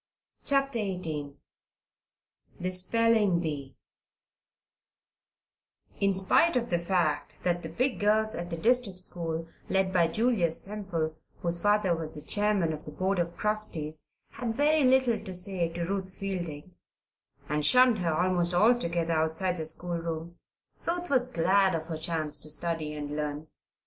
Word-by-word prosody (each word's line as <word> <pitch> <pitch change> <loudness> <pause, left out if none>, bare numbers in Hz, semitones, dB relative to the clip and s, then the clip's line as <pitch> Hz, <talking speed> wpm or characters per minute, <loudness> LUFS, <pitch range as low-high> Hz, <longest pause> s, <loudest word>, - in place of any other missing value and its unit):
CHAPTER 275 -3 +2
XVIII 160 -8 -3 1.2
THE 185 +1 -2
SPELLING 210 0 +3
BEE 145 -5 -4 2.2
In 200 -1 +2
spite 195 - +3
of 240 -3 -1
the 175 - +2
fact 170 -4 -1
that 175 -1 0
the 160 - -6
big 255 +10 -1
girls 215 +1 +2
at 175 0 -5
the 170 - -4
district 230 0 +1
school, 165 -3 -5 0.2
led 190 -1 +1
by 170 -2 +4
Julia 215 -2 +1
Semple, 175 -6 -1 0.3
whose 170 0 0
father 205 -4 +3
was 160 -1 -6
the 150 - -8
chairman 205 -3 +1
of 150 - -7
the 150 - -8
board 190 +3 -1
of 170 0 -2
trustees, 165 -8 -1 0.2
had 230 -2 -4
very 300 +1 +3
little 255 -4 +3
to 190 -3 -7
say 180 -2 -1
to 170 +1 -4
Ruth 190 0 -3
Fielding, 180 -4 -5 0.7
and 150 0 -1
shunned 250 +2 +6
her 170 -2 0
almost 175 +1 +2
altogether 175 -6 +2
outside 160 +3 0
of 180 - -5
the 160 - -3
schoolroom, 170 0 -3 0.5
Ruth 350 0 -2
was 255 -2 +2
glad 190 -1 +3
of 160 - -2
her 160 -1 -5
chance 160 -2 0
to 155 - -7
study 155 -1 -1
and 145 0 -5
learn. 150 0 -4
180 Hz, 150 wpm, -28 LUFS, 165-210 Hz, 2.2 s, shunned